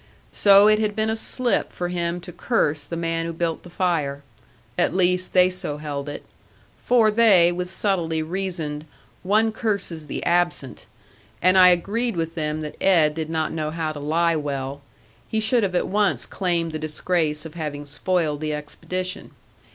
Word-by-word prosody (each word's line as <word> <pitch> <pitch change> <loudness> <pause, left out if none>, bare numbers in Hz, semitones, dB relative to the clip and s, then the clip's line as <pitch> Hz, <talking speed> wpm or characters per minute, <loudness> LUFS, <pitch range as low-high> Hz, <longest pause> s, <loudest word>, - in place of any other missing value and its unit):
So 200 0 +6
it 215 0 +4
had 210 -1 -1
been 220 0 0
a - - -1
slip 240 +2 0
for 175 0 -4
him 175 0 -2
to 180 +1 -9
curse 155 -6 0
the 170 - -5
man 165 0 -2
who - - -3
built 165 -1 -2
the 175 - -13
fire. 160 -6 -1 0.5
At - - +1
least, 180 0 +1
they 180 -1 +6
so 150 -5 -2
held 145 -1 -5
it. 145 - -7 0.5
For, 230 -3 +3
they 205 -6 +5
with 180 +1 -4
subtlety 170 -5 -1
reasoned, 160 -4 -4 0.3
one 215 +4 +2
curses 200 -8 -3
the - - -4
absent. 175 -9 0 0.5
And 185 +1 +4
I 185 -1 +8
agreed 210 +6 0
with 165 -1 -2
them 155 -1 -3
that 150 -1 -8
Ed 165 -6 +4
did 160 0 -4
not 160 -1 -1
know 155 -1 -2
how 160 0 -3
to 150 - -7
lie 165 +3 +1
well; 140 -2 -4 0.5
he 220 - 0
should 230 +2 +2
have 190 -3 -1
at - - +1
once 205 0 +1
claimed 170 -3 -1
the 155 - -4
disgrace 155 0 -1
of 160 - -8
having 150 -3 -5
spoiled 155 0 -1
the 155 -1 -2
expedition. 185 +5 -5
170 Hz, 175 wpm, -23 LUFS, 155-190 Hz, 0.5 s, I